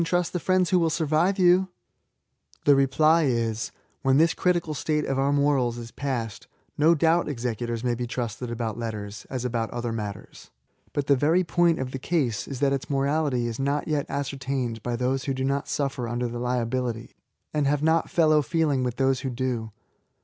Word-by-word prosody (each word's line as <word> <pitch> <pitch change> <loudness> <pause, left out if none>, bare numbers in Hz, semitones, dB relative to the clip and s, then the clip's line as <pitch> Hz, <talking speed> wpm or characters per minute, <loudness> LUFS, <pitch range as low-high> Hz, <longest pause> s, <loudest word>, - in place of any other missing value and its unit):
trust 175 +1 0
the 180 - 0
friends 185 0 +2
who 180 - +5
will 165 -1 +2
survive 160 +4 +1
you." 185 0 +5 1.0
The 145 - +7
reply 155 +4 +4
is 115 -3 -1 0.2
— - - -42
^when 135 0 +4
this 165 +2 +4
critical 175 -3 0
state 150 +1 -1
of 135 0 -1
our 140 +1 +2
morals 140 -4 +2
is 115 -1 -8
96 - - -38
SSSAYS. - - -45
past; 120 -6 -3 0.3
no 160 +3 +4
doubt 165 +1 +2
executors 120 -3 -3
may 125 -1 +1
be 120 +1 -3
trusted 120 0 -4
about 115 -1 -3
letters, 105 -3 -5
as 130 -2 -3
about 115 -2 -1
other 120 -1 -3
matters. 105 -3 -7 0.2
' - - -38
But 145 - -1
the 140 - +4
very 160 +7 +3
point 170 0 +2
of 130 -1 -4
the 135 - -5
case 130 -7 -1
is 135 -1 -6
that 140 -1 +3
its 135 0 -3
morality 140 -2 +1
is 115 0 -4
not 140 +2 0
yet 150 -3 -1
ascertained 135 -4 -3
by 120 +1 -2
those 130 +2 -1
who 135 - -1
do 130 - -2
not 140 +1 -1
suffer 135 -4 -2
under 120 +1 -2
the 120 0 -5
liability, 125 -1 -2 0.4
and 150 -2 +1
have 145 +1 +1
not 160 +1 +2
fellow 155 -3 +4
feeling 150 -2 +1
with 125 -1 -2
those 135 0 +2
who 135 - -3
do. 120 -3 -3
135 Hz, 200 wpm, -26 LUFS, 120-155 Hz, 1.0 s, The